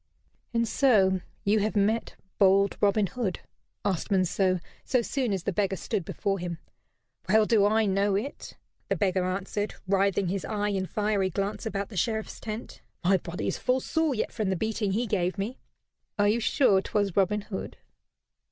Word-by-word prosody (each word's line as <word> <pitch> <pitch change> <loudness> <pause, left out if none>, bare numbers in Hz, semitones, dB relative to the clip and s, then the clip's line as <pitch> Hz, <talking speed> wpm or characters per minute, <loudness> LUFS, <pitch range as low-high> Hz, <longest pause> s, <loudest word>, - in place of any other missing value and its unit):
"And 230 -1 +1
so 195 -8 +3 0.2
you 210 +2 +3
have 215 +2 -1
met 210 +3 +1 0.2
bold 195 0 +4
Robin 205 0 +3
Hood?" 195 -2 -3 0.4
asked 190 -5 -1
Monceux, 185 -1 +2 0.2
so 250 -2 +1
soon 255 -1 -1
as 190 -3 -1
the 200 - -1
beggar 195 0 +1
stood 200 0 -2
before 195 +4 -2
him. 175 -1 -4 0.7
"Well 215 +2 +5
do 210 -3 +4
I 220 +1 +3
know 195 0 +2
it," 240 +9 -5 0.3
the - - +2
beggar 185 -2 +1
answered, 195 +3 -2
writhing 195 -1 +2
his 195 0 -2
eye 210 -1 -1
in 190 -2 -1
fiery 205 -2 0
glance 200 +5 -3
about 200 -2 -3
the 205 - -8
Sheriff's 220 +3 -1
tent. 220 +1 -7 0.2
"My 190 +2 +4
body 175 -1 -5
is - - -1
full 255 +1 +1
sore 315 +1 0
yet 215 - -2
from 215 -3 -2
the 190 - +1
beating 210 0 -1
he 235 +4 0
gave 185 -3 0
me." 215 +6 -3 0.6
"Are 205 0 +3
you 215 +3 +3
sure 215 -4 +3
'twas 200 -2 -1
Robin 205 +2 +2
Hood?" 200 -1 -6
200 Hz, 175 wpm, -27 LUFS, 190-220 Hz, 0.7 s, Well